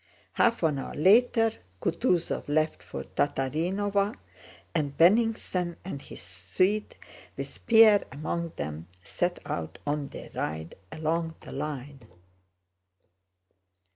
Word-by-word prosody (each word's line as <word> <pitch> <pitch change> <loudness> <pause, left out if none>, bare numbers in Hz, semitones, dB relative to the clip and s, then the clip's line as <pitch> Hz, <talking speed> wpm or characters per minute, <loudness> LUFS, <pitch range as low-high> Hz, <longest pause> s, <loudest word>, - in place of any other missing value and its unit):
Half 230 - +2
an 150 -4 +2
hour - - -6
later 225 - +5 0.3
Kutúzov 175 - 0
left 155 - +1
for 75 -6 -6
Tatárinova, 190 - 0 0.6
and 145 -4 -1
Bennigsen 185 -2 +3
and 145 -7 -5
his - - -10
suite, 95 - 0 0.4
with - - -7
Pierre 220 -3 +7
among 165 +4 -3
them, 75 +3 -5 0.2
set 175 0 -1
out 80 -2 -4
on 145 -1 -1
their - - -10
ride 80 +2 -4 0.2
along 160 +1 -1
the - - -10
line. 140 -1 -5
160 Hz, 110 wpm, -28 LUFS, 140-195 Hz, 0.6 s, Pierre